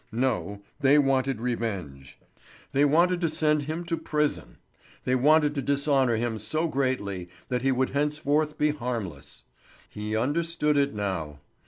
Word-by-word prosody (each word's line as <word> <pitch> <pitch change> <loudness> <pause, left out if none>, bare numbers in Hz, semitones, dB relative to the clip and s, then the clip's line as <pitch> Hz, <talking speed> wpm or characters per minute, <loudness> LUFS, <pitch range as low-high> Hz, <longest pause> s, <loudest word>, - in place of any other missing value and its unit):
No, 105 -5 -1 0.2
they 140 +2 +5
wanted 135 -3 +2
revenge. 100 - -4 0.5
They 140 +2 +3
wanted 175 +5 +3
to 165 - +1
send 155 -1 +2
him 155 +4 -4
to 170 - -1
prison. 150 -2 -2 0.5
They 125 - 0
wanted 150 +3 +4
to 140 - -2
dishonour 140 -3 +2
him 115 -1 -2
so 155 +10 -1
greatly 125 - -2 0.2
that 125 -1 -1
he 135 +1 +2
would 130 0 0
henceforth 150 +1 0
be 150 0 +2
harmless. 115 - -5 0.5
He 105 +1 -4
understood 150 +4 0
it 140 -3 +1
now. 90 -8 -3
135 Hz, 145 wpm, -27 LUFS, 110-150 Hz, 0.5 s, they